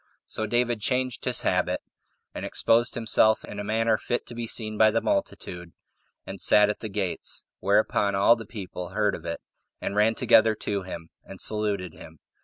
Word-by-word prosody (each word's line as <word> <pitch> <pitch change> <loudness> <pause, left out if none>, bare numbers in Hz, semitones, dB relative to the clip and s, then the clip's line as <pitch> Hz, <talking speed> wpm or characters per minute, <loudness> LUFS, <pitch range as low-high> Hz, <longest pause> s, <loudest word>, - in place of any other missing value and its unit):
So 110 - -2
David 120 -1 +1
changed 125 +3 -1
his - - +2
habit, - - +1 0.5
and - - -6
exposed 115 +1 +2
himself 110 -1 +2
in 105 - -8
a - - -3
manner 110 +1 +1
fit 120 - -2
to - - -10
be 120 -1 -4
seen 110 -1 -2
by 110 +1 +5
the 115 +1 +1
multitude, 90 -4 -3 0.5
and 95 -2 -8
sat 105 0 +5
at - - -8
the 110 - -6
gates; 95 -3 -3
whereupon 100 0 +2
all 100 +4 +5
the 115 -3 -9
people 90 -5 -7
heard 105 -2 0
of - - -7
it, 85 0 -4 0.4
and - - -4
ran 110 +2 +3
together 110 0 +4
to 100 -1 -3
him, 85 -3 -8
and 95 - -11
saluted 100 -5 -1
him. 80 0 -13
105 Hz, 185 wpm, -26 LUFS, 100-115 Hz, 0.5 s, by